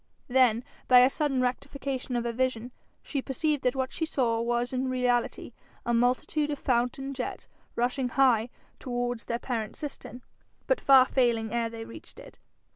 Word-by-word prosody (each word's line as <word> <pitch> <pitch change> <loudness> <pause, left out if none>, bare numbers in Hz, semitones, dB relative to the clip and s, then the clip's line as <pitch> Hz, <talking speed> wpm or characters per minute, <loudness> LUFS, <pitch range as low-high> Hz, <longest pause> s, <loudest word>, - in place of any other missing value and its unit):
Then, 245 -2 +4 0.2
by 250 -1 +8
a 255 +2 +5
sudden 275 -4 0
rectification 260 0 -3
of 240 - 0
her 235 - -1
vision, 245 0 -1 0.3
she 280 - -3
perceived 295 +2 -1
that 250 -1 +1
what 260 -1 -1
she 330 - -4
saw 235 -6 0
was 240 +1 -1
in 260 0 -1
reality 250 -2 0 0.3
a 240 - 0
multitude 250 +5 +1
of 290 - -2
fountain 255 +2 -1
jets 255 -2 -5 0.3
rushing 250 +1 0
high 245 -3 +3 0.3
towards 245 -2 -3
their 235 - -2
parent 235 -3 -4
cistern, 275 -4 -8 0.4
but - - +1
far 265 -2 +7
failing 235 -4 +1
ere 235 -1 0
they 225 0 -7
reached 230 - -12
it. - - -14
250 Hz, 165 wpm, -28 LUFS, 240-265 Hz, 0.4 s, by